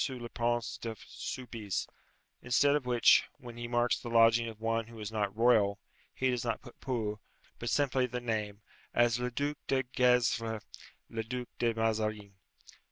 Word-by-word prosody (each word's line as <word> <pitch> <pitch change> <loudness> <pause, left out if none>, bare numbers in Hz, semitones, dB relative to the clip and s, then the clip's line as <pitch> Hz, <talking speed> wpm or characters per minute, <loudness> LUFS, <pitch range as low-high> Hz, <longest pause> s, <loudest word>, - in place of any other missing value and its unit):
le 120 -3 -6
Prince 120 0 -1
de 115 -1 -4
Soubise;' 115 -6 -4 0.5
instead 140 +4 +3
of 140 -4 -1
which, 120 -1 +5
when 120 -2 -10
he 120 0 -5
marks 120 0 +1
the 120 - -7
lodging 115 0 +5
of 110 -1 -11
one 115 0 0
who 115 -1 -11
is 105 0 -5
not 105 -2 -2
royal, 110 -4 +4 0.3
he 130 0 0
does 125 -2 -1
not 115 -2 -1
put 120 - -15
pour, 110 -5 -2 0.4
but 120 - -3
simply 130 -2 +2
the 125 0 -4
name 110 -3 -3 0.3
as, 120 0 +3
'Le 125 0 -1
Duc 145 +4 -2
de 135 -1 +2
Gesvres, 115 -3 +2 0.4
le 115 - -3
Duc 125 +2 -5
de 120 -1 +2
Mazarin.'" 110 -2 -1
120 Hz, 165 wpm, -31 LUFS, 110-125 Hz, 0.5 s, which